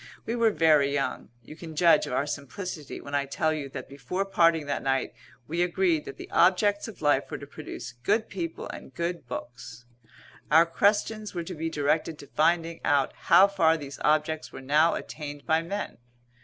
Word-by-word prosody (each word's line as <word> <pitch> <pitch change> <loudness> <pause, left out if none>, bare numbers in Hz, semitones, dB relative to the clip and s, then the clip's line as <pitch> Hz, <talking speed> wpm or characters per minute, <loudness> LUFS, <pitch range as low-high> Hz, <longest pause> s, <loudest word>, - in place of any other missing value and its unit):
We 230 - -2
were 230 -2 +4
very 155 -6 +4
young. 140 -1 -2
You 155 - -11
can 160 -1 -9
judge 170 +2 +4
of - - -5
our 135 - +1
simplicity 150 +2 -6
when 140 - -10
I 140 -1 0
tell 155 +3 0
you 145 -3 -4
that 130 -1 -7
before 140 +8 -3
parting 165 -5 +3
that 140 - -2
night 135 0 0 0.3
we 170 +3 -1
agreed 175 -3 +1
that 135 - -8
the - - -9
objects 205 +4 +3
of 215 -7 -10
life 145 -2 +2
were - - -4
to 140 - -9
produce 140 -4 -8
good 215 - +1
people 170 -3 -5
and 130 - -10
good 170 -4 -3
books. 120 -1 -8 0.6
Our 160 +2 +6
questions 205 +4 0
were 170 - -2
to 180 - -7
be 165 0 -3
directed 155 +1 0
to 145 - -11
finding 165 +1 +2
out 145 -3 +2
how 195 - +6
far 165 -5 +3
these 140 -3 -9
objects 155 +1 +1
were - - -9
now 150 +5 +3
attained 145 -2 -7
by 160 0 +2
men. 200 -1 -5
160 Hz, 190 wpm, -27 LUFS, 140-175 Hz, 0.6 s, Our